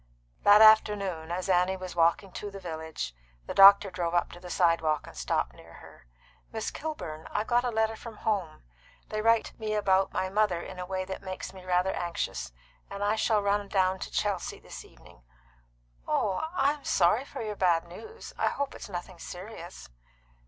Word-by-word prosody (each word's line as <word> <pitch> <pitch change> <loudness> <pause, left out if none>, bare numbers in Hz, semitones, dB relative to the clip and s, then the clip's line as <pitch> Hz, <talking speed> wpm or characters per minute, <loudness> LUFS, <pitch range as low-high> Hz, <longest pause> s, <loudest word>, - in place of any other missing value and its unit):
That 205 +1 +7
afternoon, 200 -6 +4
as 180 +2 -3
Annie 185 0 +2
was 185 -1 -7
walking 170 +3 +2
to 205 - -6
the 195 0 -9
village, 160 - -5 0.3
the - - -5
doctor 195 0 +8
drove 175 -1 -2
up 175 - +1
to 175 - -11
the 180 0 -10
sidewalk, 165 -4 +2
and - - -13
stopped - - -1
near - - -16
her. - - -15 0.4
"Miss 220 -1 -3
Kilburn, 165 - -6
I've 210 - -1
got 240 +1 +2
a 250 - 0
letter 220 -1 0
from 225 0 -10
home. 190 - -2 0.5
They 215 0 -2
write 230 0 +2
me 215 -1 -2
about 195 -2 +2
my 185 - -1
mother 195 -2 +1
in 185 +1 -8
a 180 - -5
way 185 0 -3
that 190 - -6
makes 185 -1 -6
me 190 -1 -12
rather 180 +1 +1
anxious, 65 - -3 0.4
and 200 0 -5
I 205 +1 +2
shall 215 -1 +1
run 200 0 +1
down 190 -1 +1
to - - -5
Chelsea 200 -4 -2
this - - -10
evening." - - -19 0.9
"Oh, 210 +10 0
I'm 290 -1 +1
sorry 190 +8 +3
for 275 - -7
your 210 -1 -4
bad 175 -4 +2
news. 440 - -11
I - - +2
hope 280 -1 -2
it's - - -9
nothing 180 -1 -7
serious." 180 -1 -9
190 Hz, 185 wpm, -28 LUFS, 175-215 Hz, 0.9 s, doctor